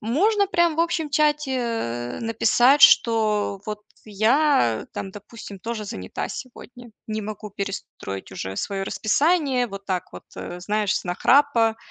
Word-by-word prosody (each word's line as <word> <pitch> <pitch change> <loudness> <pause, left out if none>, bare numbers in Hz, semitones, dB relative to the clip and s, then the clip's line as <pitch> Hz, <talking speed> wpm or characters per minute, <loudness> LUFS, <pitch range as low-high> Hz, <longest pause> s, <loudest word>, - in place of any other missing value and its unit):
Можно 395 - +2
прям 345 -4 +2
в - - +2
общем 335 -2 0
чате, 300 -2 +1
э, 120 - -3
написать, 240 +5 +3
что 215 -3 +4
вот 210 -1 -6 0.2
я, 220 - +2
э, - - -14
там, 190 - -6
допустим, 205 -1 -11
тоже 225 -2 -4
занята 95 - -5
сегодня, 245 -1 -10 0.2
не 215 -1 -3
могу 215 0 -7
перестроить 195 - -6
уже 95 +1 -6
своё 195 -1 -3
расписание. 270 - +1
Вот 195 0 -9
так 185 -3 -3
вот, - - -10
э, 175 - -7
знаешь, 210 +2 0
с - - -4
нахрапа, 230 +4 +3
225 Hz, 145 wpm, -23 LUFS, 200-275 Hz, 0.2 s, что